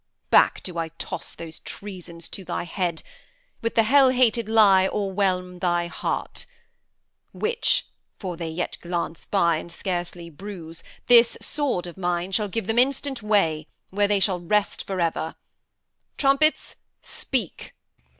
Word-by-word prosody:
Back - - +5
do 175 -2 -5
I 165 - -1
toss 165 +1 -6
those 165 -1 -8
treasons 180 -4 -8
to 195 - -5
thy 170 - -3
head; 175 -1 -2 0.6
With 230 -1 -2
the 225 - +5
hell 270 +4 +6
hated 240 -3 +3
lie 200 -4 +6
o'erwhelm 185 -3 -1
thy 175 -1 +1
heart; 170 - -4 0.9
Which 470 +2 +1 0.3
for 185 -4 -5
they 165 -1 -4
yet 165 +2 -3
glance 170 -1 -3
by 170 -5 +2
and 170 +2 -7
scarcely 175 -2 -4
bruise 170 -1 -8 0.2
This 235 -1 +6
sword 275 -12 -1
of 175 0 -9
mine 175 0 -1
shall 210 +2 +1
give 225 +1 -3
them 225 +3 +2
instant 270 0 +1
way 165 -8 +1 0.2
Where 205 +1 +2
they 205 -1 +2
shall 190 -2 +2
rest 205 +4 0
for 190 -1 -3
ever. 165 -1 -1 0.8
Trumpets, 280 +3 +2 0.3
speak! 240 - -2
190 Hz, 140 wpm, -24 LUFS, 170-220 Hz, 0.9 s, hell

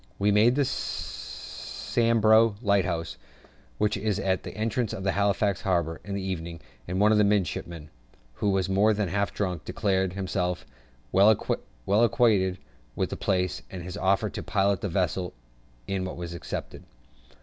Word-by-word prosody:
We 100 +1 +2
made 110 +4 +5
Sambro' 115 - +1
Lighthouse 95 -5 0 0.6
(which 105 +5 +1
is 105 -1 -1
at 95 -2 0
the - - -9
entrance 115 +1 -1
of 95 - -5
Halifax 100 0 +1
harbour) 85 -4 0
in 100 +1 -5
the 100 - -3
evening, 85 -3 -4 0.3
and 90 +1 -2
one 105 +1 +5
of 105 - +4
the - - +6
midshipmen, 85 -5 -1 0.4
who 100 - -1
was 95 -1 +1
more 100 +3 +3
than 100 -3 -1
half 100 +2 0
drunk, 90 -6 -2
declared 95 -1 0
himself 90 -2 -2 0.5
well 100 +3 +6 0.6
acquainted 105 -3 +3 0.4
with - - -1
the - - -2
place, 90 -2 0
and 90 -2 -7
his 90 +2 -6
offer 100 +2 +1
to - - -5
pilot 100 -2 +1
the 100 - -2
vessel 90 0 -1 0.5
in 95 -1 -2
was 85 -2 -5
accepted. 85 - -6
95 Hz, 150 wpm, -27 LUFS, 90-105 Hz, 0.6 s, the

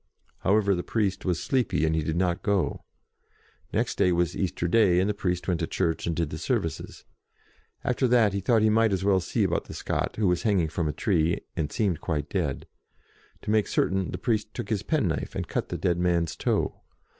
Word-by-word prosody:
However, 100 0 +3
the 90 - -1
priest 100 -1 -1
was 90 -3 0
sleepy, 125 - +1
and 80 - +1
he 80 - +1
did 80 +1 -2
not 90 0 0
go. 100 -3 0 0.9
Next - - -1
day 90 - +4
was 85 0 +1
Easter 85 -2 -1
Day, 95 -3 +4
and 95 - +2
the 105 - +1
priest 90 -3 -2
went 90 -3 +1
to 80 - -1
church 85 -3 -1
and 85 - 0
did 80 -2 -1
the - - -5
services. - - -3 0.8
After 125 +1 +1
that, 115 -4 +4
he 100 - 0
thought 110 +3 +2
he 110 - +4
might 110 0 +3
as 95 0 -1
well 100 -1 +4
see 90 - -1
about - - 0
the - - -9
Scot - - -2
who 110 - 0
was 90 -1 +1
hang 105 -4 +2
ing 80 - -1
from 80 0 -1
a - - 0
tree, 85 0 +1
and 80 -4 -2
seemed 95 -7 0
quite 75 -3 -2
dead. 80 -8 -2 0.8
To - - -2
make 110 -2 +3
certain, 95 -1 0
the - - -4
priest 110 +2 -1
took 120 - -5
his 105 -4 0
pen 150 - 0
knife, 80 - -3
and - - -3
cut - - -2
the - - -3
dead 85 -2 0
man's 85 -3 +1
toe. - - -1
95 Hz, 220 wpm, -27 LUFS, 85-105 Hz, 0.9 s, day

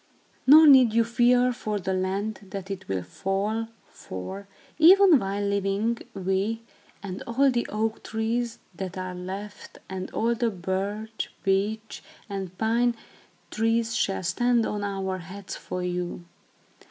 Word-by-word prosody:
Nor 310 +4 +10
need 260 -6 +7
you 230 0 +4
fear 245 +2 +3
for 215 -3 -3
the 190 -1 -2
land, 195 +3 -2
that 195 -1 -6
it 190 -1 -6
will 95 -2 -2
fall; 205 - -2 0.2
for, 190 - -8 0.3
even 365 -1 +8
while 200 0 -2
living, 200 +3 0 0.2
we, 195 +4 -1 0.4
and 190 0 -6
all 265 +4 +3
the 240 -1 -1
oak 220 +1 -2
trees 230 +1 -2 0.2
that 185 +1 -6
are 185 0 -4
left, 190 +3 -8
and 190 -1 -5
all 230 +2 0
the 235 0 0
birch, 200 +3 -3
beech, 210 +3 -1 0.3
and 190 -3 -6
pine 235 +2 +2 0.6
trees 225 +1 +1
shall 195 -1 0
stand 235 +6 +2
on 205 -1 -3
our 190 -2 -2
heads 190 +3 -8
for 180 0 -5
you. 180 -1 -3
205 Hz, 140 wpm, -26 LUFS, 190-230 Hz, 0.6 s, Nor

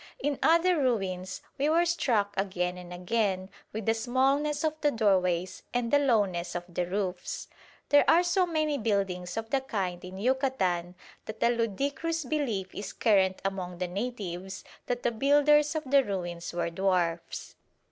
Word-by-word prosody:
In 290 - -2
other 335 +1 +4
ruins 190 -8 -1 0.2
we 290 +2 +2
were 335 +2 +4
struck 230 -12 +1
again 185 -2 -1
and 180 -1 -10
again 190 0 -1 0.2
with 220 -1 -5
the 225 - +3
smallness 270 +6 +1
of 315 -1 +1
the 295 - +4
doorways 185 -6 +1
and 245 0 0
the 285 - +7
lowness 200 -11 +1
of 175 - -2
the 175 0 -2
roofs. 185 -1 -3 0.4
There 290 0 +5
are 335 +2 +6
so 360 +1 +2
many 310 -3 0
buildings 195 -4 -1
of 225 0 -4
the 275 - +2
kind 190 -9 -3
in 185 +1 -8
Yucatan 195 -8 0 0.3
that 220 0 -5
a 235 - +5
ludicrous 275 - -1
belief 235 -10 -2
is 205 - -6
current 190 -4 +2
among 185 -2 -3
the 180 0 -2
natives 190 -2 -5 0.2
that 245 0 -2
the 240 - +2
builders 290 +5 +4
of 310 - -1
the 275 0 +4
ruins 175 -5 -4
were 170 -1 -2
dwarfs. 175 -2 -1
215 Hz, 160 wpm, -29 LUFS, 185-275 Hz, 0.4 s, the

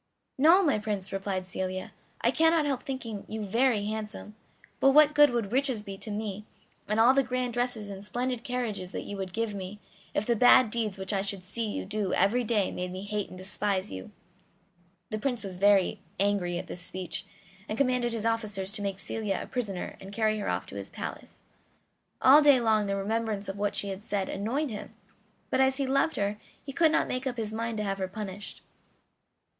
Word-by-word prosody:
"No, 335 +7 +7
my 285 - +2
Prince," 205 -3 -3
replied 195 -1 -2
Celia; 185 0 -4 0.3
"I - - +3
cannot 325 -1 +4
help 275 -3 -1
thinking 230 -7 -5
you 220 0 -4
very 225 +1 +2
handsome; 215 0 -5 0.5
but 270 - +5
what 300 0 +7
good 295 -1 +7
would 230 -4 -2
riches 260 -4 +2
be 200 -2 -7
to - - -5
me, 210 -1 -4 0.4
and 215 +1 +1
all 240 +3 +7
the 275 - +4
grand 250 -1 -2
dresses 240 -4 -1
and 195 0 -8
splendid 245 +3 -2
carriages 235 -7 -3
that - - -3
you 205 - -6
would 190 -1 -4
give 225 +2 -2
me, 195 +1 -6 0.4
if 210 - +1
the 235 - +2
bad 245 0 +6
deeds 215 -4 -1
which 190 +2 -2
I 195 - +1
should 195 -1 -3
see 220 +5 -3
you - - -3
do 205 0 -1
every 220 +7 +3
day 210 -4 +1
made 180 0 -4
me 185 +1 -6
hate 205 -1 -3
and 185 - -10
despise 190 - -1
you?" 95 -1 -7 1.0
The 215 - -2
Prince 245 0 -2
was 190 -2 -6
very 200 -1 +4 0.2
angry 195 -3 +1
at - - -4
this 180 - -7
speech, 180 -1 -5 0.5
and 215 - -2
commanded 250 -2 +2
his 225 -1 -3
officers 210 -4 -1
to 210 0 +1
make 200 -1 -2
Celia 200 -1 -2
a - - -5
prisoner 205 -8 -4
and 195 +1 -10
carry 215 0 +1
her 205 - -2
off - - -1
to - - -10
his - - -5
palace. - - -8 0.8
All 280 +4 +9
day 285 -3 +7
long 220 -3 +2
the 200 - 0
remembrance 210 0 -1
of 195 +1 -5
what 205 0 0
she 200 - 0
had 195 +1 -6
said 200 -3 -2
annoyed 245 +8 -1
him, 210 - -7 0.6
but 260 - +3
as 265 0 +4
he 275 - 0
loved 275 +4 +2
her 205 +1 -1 0.3
he 275 - -6
could 320 +1 +4
not - - +2
make 255 +1 -2
up 250 -2 -3
his 220 -1 -3
mind 230 0 -2
to 210 - -1
have 195 -1 -2
her 190 - -1
punished. 200 0 -7
215 Hz, 210 wpm, -29 LUFS, 195-245 Hz, 1.0 s, All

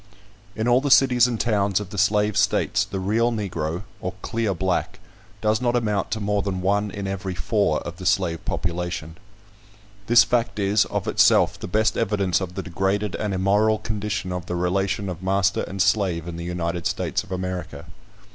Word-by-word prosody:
In 110 +2 -1
all 125 +1 +4
the 145 - -1
cities 125 -3 +5
and 120 -3 -3
towns 100 -4 +1
of 100 -2 -8
the 105 - -6
slave 105 0 +2
states, - - +2
the 95 - -5
real 110 +5 +1
Negro, 90 -5 -3 0.2
or - - -5
clear 110 -4 -1
black, 95 0 -1 0.4
does 110 +2 +1
not 120 -1 +1
amount 105 -5 0
to 110 - -2
more 105 -1 0
than 95 -2 -3
one 100 +2 +1
in 100 0 -6
every 95 -1 -4
four 90 0 0
of 85 -1 -7
the 95 - -4
slave 90 -3 +1
population. 85 -1 -3 0.9
This 120 0 +7
fact 120 -2 0
is, 100 +1 +2
of - - -3
itself, - - +4
the - - -6
best 110 +4 +1
evidence 100 -4 +1
of 90 -1 -5
the - - -3
degraded 95 +2 -1
and 105 -2 -2
immoral 100 +3 +2
condition 105 -3 -3
of 90 -1 -5
the 90 - -3
relation 95 +3 0
of 90 -2 -5
master 95 +1 +1
and 95 - -7
slave 95 -5 +1
in 85 - -5
the 85 0 -6
United 85 -1 -2
States - - -2
of - - -16
America. 90 -1 -4
100 Hz, 185 wpm, -23 LUFS, 90-105 Hz, 0.9 s, This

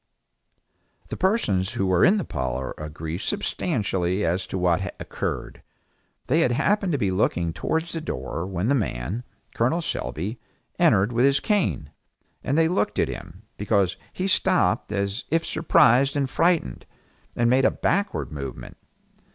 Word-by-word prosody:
The - - -2
persons 105 - +1
who 95 - -1
were 95 -2 +3
in 195 +4 +5
the 195 - -1
parlor 65 -1 -3
agree 80 +2 -5
substantially 95 -1 -1
as 90 +3 -1
to - - -4
what 90 +1 0
occurred. - - -4 0.6
They 155 +6 +2
had 125 -7 +3
happened 195 - +1
to - - +2
be 100 -7 0
looking 85 -3 0
towards 160 - -2
the 165 - -3
door 65 - -4
when 95 +1 -2
the 140 - +3
man 105 - -2 0.3
Col. 130 +9 +1
Selby 95 - -3 0.4
entered 100 +5 +4
with 120 +3 +3
his 140 0 +4
cane, 185 - 0 0.5
and 140 - 0
they 165 0 +4
looked 180 +4 0
at - - +2
him, 90 +4 -9
because 100 -3 +1 0.2
he 185 - -3
stopped 185 - +2
as 100 +3 -2
if 165 +1 +1
surprised 135 -3 +4
and 140 -1 +1
frightened, 165 - 0 0.5
and 120 - +2
made 130 +2 +4
a - - +6
backward 200 - -1
movement. 70 -4 -7
105 Hz, 150 wpm, -24 LUFS, -, 0.6 s, a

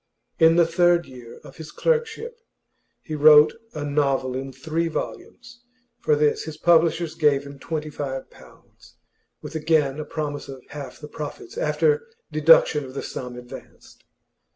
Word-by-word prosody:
In 165 0 +6
the 170 -1 +5
third 170 +1 +3
year 125 -3 -12
of - - -14
his 155 -1 -9
clerkship 470 0 -1 0.6
he 155 - -7
wrote 150 0 +7 0.2
a 150 -1 -4
novel 140 -3 0
in 135 +1 -5
three 160 +6 -2
volumes; 240 +8 -7 0.4
for 150 - +2
this 150 0 +1
his 155 -1 -7
publishers 170 -1 +3
gave 145 -3 +2
him 140 -1 -11
twenty 155 0 -4
five 135 -3 -5
pounds, - - -19 0.5
with - - -8
again 155 -3 +1
a - - -3
promise 150 -1 -5
of 135 -2 -9
half 140 -3 -9
the 150 - -9
profits 155 - -8
after 465 -1 +1 0.2
deduction - - +5
of 130 0 -10
the - - -4
sum 125 -1 -7
advanced. 125 0 -13
150 Hz, 150 wpm, -23 LUFS, 140-170 Hz, 0.6 s, wrote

